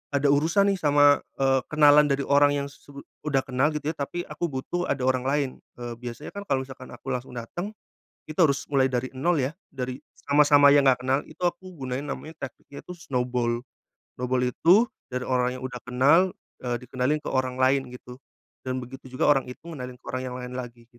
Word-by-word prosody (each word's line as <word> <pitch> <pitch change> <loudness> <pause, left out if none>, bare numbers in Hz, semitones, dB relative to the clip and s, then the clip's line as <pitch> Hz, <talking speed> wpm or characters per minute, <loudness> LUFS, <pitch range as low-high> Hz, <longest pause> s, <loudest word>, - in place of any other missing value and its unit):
ada 140 0 +3
urusan 170 +8 +3
nih 195 - -2
sama, 145 -1 +5 0.2
eee, 135 -1 +3
kenalan 150 -1 +6
dari 140 0 0
orang 145 0 +4
yang 140 0 -2
su 140 0 -13 0.2
udah 135 -2 +2
kenal 130 +2 +1
gitu 150 +1 -1
ya, - - -12
tapi 175 +5 -3
aku 150 +3 -3
butuh 165 +5 -3
ada 135 -2 -1
orang 130 0 +1
lain. 140 -1 +1 0.3
Eee, 120 -1 -6
biasanya 125 +4 -7
kan 200 0 -8
kalo 130 -1 +1
misalkan 130 -1 -11
aku 135 - -7
langsung 125 0 -4
dateng, 175 - -6 0.5
itu 155 - -7
harus 140 -6 +2
mulai 135 -2 +3
dari 130 -1 -1
nol 165 0 +2
ya, 145 +7 -3 0.2
dari 125 -1 -4 0.2
sama 145 +1 +3
sama 145 -1 +7
yang 140 -1 +5
nggak 125 -2 +4
kenal, 135 +2 0
itu - - -16
aku 185 +1 -2
gunain 135 -1 -4
namanya 155 +2 -7
tekniknya 140 +2 -12
itu 180 - -7
snowball, 125 -6 -2 0.5
snowball 125 0 0
itu 170 - +4 0.2
dari 125 0 -4
orang 125 0 0
yang 130 - -8
udah 125 -1 -5
kenal, 145 +9 +4 0.2
eee, 125 -1 -2
dikenalin 130 +4 -1
ke - - -4
orang 130 -1 0
lain 130 0 +2
gitu. 125 +1 -12 0.5
Dan 130 0 -2
begitu 130 +1 -11
juga 150 - +2
orang 135 -3 +2
itu 125 +4 -10
ngenalin 125 -4 -7
ke - - -26
orang 130 0 -2
yang 125 - -6
lain 125 0 -6
lagi, 120 -1 -9
135 Hz, 205 wpm, -26 LUFS, 125-150 Hz, 0.5 s, sama